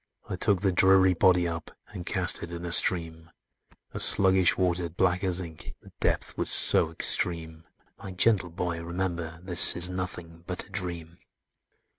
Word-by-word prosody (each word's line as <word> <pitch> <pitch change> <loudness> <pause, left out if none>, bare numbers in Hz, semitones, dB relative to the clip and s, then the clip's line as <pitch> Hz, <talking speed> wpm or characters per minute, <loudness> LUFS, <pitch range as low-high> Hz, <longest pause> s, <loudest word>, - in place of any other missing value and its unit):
"I - - -6
took 95 -3 -1
the 100 -2 -1
dreary 95 +1 +2
body 90 0 +1
up, 85 -1 -8 0.2
And 90 -4 -11
cast 95 0 +3
it 85 - -9
in 85 0 -9
a 85 - -7
stream,— 80 -2 0 0.6
A - - -8
sluggish 95 -2 +2
water, 90 -2 -3
black 90 +2 -2
as 90 -1 -2
ink, 85 -3 -11
The - - -19
depth - - -3
was - - -1
so 80 - +3
extreme: 80 -1 0 0.4
My 100 - -10
gentle 95 -1 0
boy, 85 0 -6
remember 85 -1 -6
this 90 -2 +7
Is 90 +1 +4
nothing 90 -2 -8
but 90 -1 -6
a 100 - -23
dream! 85 -4 -7
90 Hz, 165 wpm, -25 LUFS, 85-95 Hz, 0.6 s, this